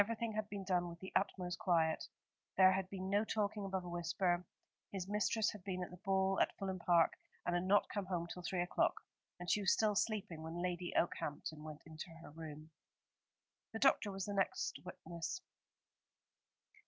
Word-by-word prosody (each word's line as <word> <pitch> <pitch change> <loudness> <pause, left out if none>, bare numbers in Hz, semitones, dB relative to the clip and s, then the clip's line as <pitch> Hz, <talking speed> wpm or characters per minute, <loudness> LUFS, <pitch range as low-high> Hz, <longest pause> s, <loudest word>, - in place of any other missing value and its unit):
Everything 225 +1 -1
had 215 -1 -2
been 200 -1 -4
done 180 -2 +1
with 170 0 -9
the 190 - -8
utmost 180 -2 0
quiet. 165 -6 +2 0.5
There 185 0 +9
had 190 0 0
been 190 -1 -4
no 205 +1 +4
talking 210 -2 -1
above 190 -2 -2
a - - -5
whisper. 175 +1 +1 0.5
His 190 -2 -3
mistress 210 +2 +2
had 210 -4 -10
been 185 -1 -2
at - - -7
the 180 - -9
ball 195 -1 +2
at - - +1
Fulham 190 -1 -2
Park, 170 -2 +5 0.3
and 175 - +1
had 175 +1 +1
not 205 +2 +5
come 205 -3 -3
home 175 -2 -1
till 180 +1 -7
three 175 0 0
o'clock, 180 - +2 0.4
and 175 - -6
she 210 - +3
was 195 - +5
still 215 -1 +3
sleeping 205 -6 0
when 165 +2 -5
Lady 180 0 -1
Okehampton 155 -2 -1
went 155 -1 -8
into 160 +2 -7
her - - -10
room." 155 0 -8 1.0
The - - -2
doctor 245 -6 +4
was 195 -1 -3
the 205 - -3
next 195 -1 0
witness. 180 - -5
185 Hz, 185 wpm, -38 LUFS, 175-200 Hz, 1.0 s, There